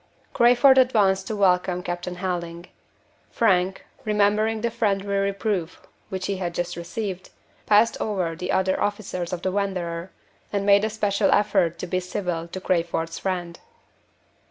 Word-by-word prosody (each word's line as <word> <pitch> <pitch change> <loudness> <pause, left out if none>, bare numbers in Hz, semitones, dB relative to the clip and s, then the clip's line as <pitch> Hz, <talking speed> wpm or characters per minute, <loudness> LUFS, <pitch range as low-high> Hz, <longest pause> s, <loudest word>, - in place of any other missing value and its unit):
Crayford 250 +3 +6
advanced 200 -7 +3
to 220 - -3
welcome 180 -2 +2
Captain 175 0 -4
Helding. 175 -2 -4 0.6
Frank, 190 -4 +1 0.2
remembering 215 +1 +1
the 235 +1 -1
friendly 205 -4 0
reproof 195 -3 -1 0.3
which 190 -1 -4
he 200 -1 -2
had 175 -2 -4
just 175 0 -2
received, 185 +2 -5 0.4
passed 215 +2 +4
over 185 -6 -1
the 180 +2 -4
other 190 0 +1
officers 200 -4 -2
of 175 -1 -4
the 185 - 0
Wanderer, 185 -3 -2 0.4
and 200 -1 -1
made 200 0 +5
a 220 - +1
special 205 -2 0
effort 195 -5 +2
to - - -5
be 185 +1 -1
civil 180 -2 -3
to 185 - -6
Crayford's 165 -2 -1
friend. 175 -3 -3
190 Hz, 145 wpm, -24 LUFS, 175-205 Hz, 0.6 s, Crayford